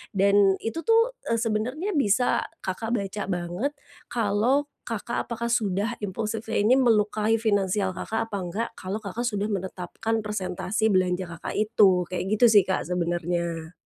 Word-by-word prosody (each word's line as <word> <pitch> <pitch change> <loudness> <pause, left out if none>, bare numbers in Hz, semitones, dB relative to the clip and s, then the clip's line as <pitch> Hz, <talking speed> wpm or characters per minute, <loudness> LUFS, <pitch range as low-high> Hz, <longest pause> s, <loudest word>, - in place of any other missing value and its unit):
dan 200 0 +5
itu 225 +8 -3
tuh, 460 +2 +4 0.2
eee, 230 - +2
sebenarnya 240 - -1
bisa 245 - +2 0.3
Kakak 225 +5 -2
baca 200 -1 -3
banget, 180 +8 -2 0.4
kalau 230 +5 +1 0.2
Kakak 230 0 -3
apakah 235 0 -3
sudah 215 0 0
impulsifnya 215 +2 -2
ini 245 +5 +5
melukai 220 -2 +3
finansial 200 -3 +1
Kakak 225 +4 -3
apa 200 - -2
nggak, 225 +7 -2
kalau 195 +4 -4
Kakak 220 +5 -3
sudah 205 -2 -1
menetapkan 190 +3 -3
persentase 210 +1 -1
belanja 185 0 +1
Kakak - - -5
itu. 205 -4 +4
Kayak 180 0 -3
gitu 245 - +6
sih 210 -2 +7
Kak, 190 - -1
sebenarnya. 170 -1 -2
210 Hz, 145 wpm, -26 LUFS, 185-225 Hz, 0.4 s, sih